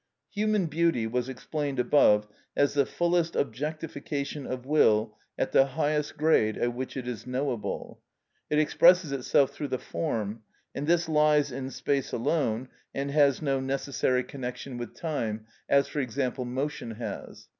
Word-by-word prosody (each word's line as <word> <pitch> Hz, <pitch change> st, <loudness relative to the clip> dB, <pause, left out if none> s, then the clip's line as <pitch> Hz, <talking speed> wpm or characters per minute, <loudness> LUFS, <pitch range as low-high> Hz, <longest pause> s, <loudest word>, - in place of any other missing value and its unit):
Human 210 Hz, -2 st, +1 dB
beauty 165 Hz, -6 st, +1 dB
was 125 Hz, +3 st, -1 dB
explained 140 Hz, +1 st, -3 dB
above 120 Hz, -5 st, +4 dB, 0.3 s
as 145 Hz, -, +3 dB
the 140 Hz, -2 st, +2 dB
fullest 170 Hz, -1 st, +1 dB
objectification 145 Hz, +1 st, -3 dB
of 130 Hz, -1 st, -5 dB
will 110 Hz, -7 st, +3 dB, 0.2 s
at -, -, -1 dB
the 135 Hz, -, +5 dB
highest 150 Hz, -1 st, 0 dB
grade 145 Hz, -9 st, +3 dB
at 120 Hz, 0 st, 0 dB
which 130 Hz, +2 st, -5 dB
it 125 Hz, -2 st, -5 dB
is 125 Hz, 0 st, -5 dB
knowable. 125 Hz, -3 st, -3 dB, 0.5 s
It 150 Hz, -, +1 dB
expresses 170 Hz, +2 st, +5 dB
itself 135 Hz, 0 st, +2 dB
through 145 Hz, -, -5 dB
the 130 Hz, -1 st, -1 dB
form; 115 Hz, -8 st, -3 dB, 0.3 s
and 145 Hz, +2 st, -4 dB
this 170 Hz, 0 st, +3 dB
lies 150 Hz, -2 st, +3 dB
in 130 Hz, +1 st, -4 dB
space 135 Hz, 0 st, -1 dB
alone, 130 Hz, -2 st, 0 dB, 0.3 s
and 140 Hz, +1 st, -2 dB
has 145 Hz, 0 st, +3 dB
no 135 Hz, -2 st, +1 dB
necessary 130 Hz, -1 st, 0 dB
connection 125 Hz, -1 st, -6 dB
with 120 Hz, -, -7 dB
time, 115 Hz, -9 st, -3 dB, 0.2 s
as, 140 Hz, 0 st, +4 dB
for 150 Hz, -, -4 dB
example, 130 Hz, 0 st, -2 dB
motion 125 Hz, -2 st, -3 dB
has. 115 Hz, -, -7 dB
140 Hz, 150 wpm, -28 LUFS, 125-150 Hz, 0.5 s, the